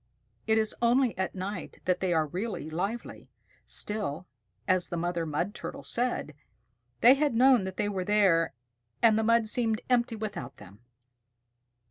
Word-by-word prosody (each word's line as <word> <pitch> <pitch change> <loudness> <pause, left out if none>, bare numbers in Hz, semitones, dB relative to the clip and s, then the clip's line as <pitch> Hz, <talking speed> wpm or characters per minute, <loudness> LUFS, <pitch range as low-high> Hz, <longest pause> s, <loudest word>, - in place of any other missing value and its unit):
It 220 0 +3
is 220 -1 +1
only 240 +1 +3
at 190 +1 -3
night 190 0 -5
that 180 -1 +1
they 185 -2 0
are 160 -2 +2
really 180 -1 -5
lively. 200 +9 -4 0.4
Still, 200 -7 -3 0.4
as 185 -1 +3
the 175 - -3
Mother 170 -1 -2
Mud 170 +7 -2
Turtle - - -7
said, 240 -10 -1 0.7
"They 245 - +8
had 285 -3 0
known 250 -4 +5
that 190 -1 -6
they 210 - 0
were 195 -3 -2
there, 185 -6 +2 0.5
and 225 -2 +6
the 220 - +1
mud 230 0 +3
seemed 225 -1 0
empty 240 -1 +2
without 215 -1 -6
them." 100 0 -14
205 Hz, 155 wpm, -28 LUFS, 175-230 Hz, 0.7 s, They